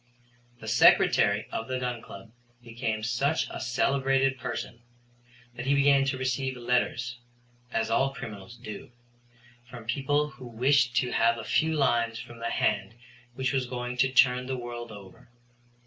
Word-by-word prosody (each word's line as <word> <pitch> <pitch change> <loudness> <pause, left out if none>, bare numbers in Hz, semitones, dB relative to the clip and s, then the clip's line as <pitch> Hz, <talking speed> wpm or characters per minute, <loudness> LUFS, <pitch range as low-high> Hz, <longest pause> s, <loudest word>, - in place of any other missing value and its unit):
The - - -10
Secretary 100 +1 +4
of 110 - -4
the 130 0 -2
Gun 125 -2 -3
Club 105 +1 -12 0.3
became 115 -2 -3
such 135 +7 0
a - - -6
celebrated 135 +1 +1
person 115 -1 -5 0.7
that 120 +2 -6
he 140 - +4
began 140 -1 +4
to 135 -1 -1
receive 130 0 -2
letters, 125 0 -1 0.5
as 115 -1 -1
all 135 +4 +2
criminals 110 -3 -9
do, 110 -2 -9 0.8
from 120 -3 -10
people 145 +4 0
who 130 -2 -11
wished 125 +1 +2
to 125 0 +1
have 115 0 +3
a 115 - -6
few 160 +6 +1
lines 120 -5 +1
from 120 0 -10
the 115 - -2
hand 100 +3 0 0.4
which 130 +2 -1
was 130 -2 0
going 125 0 -4
to 130 +2 +3
turn 125 -1 +4
the 130 -1 -2
world 120 -1 -7
over. 100 +1 -13
125 Hz, 155 wpm, -28 LUFS, 115-135 Hz, 0.8 s, Secretary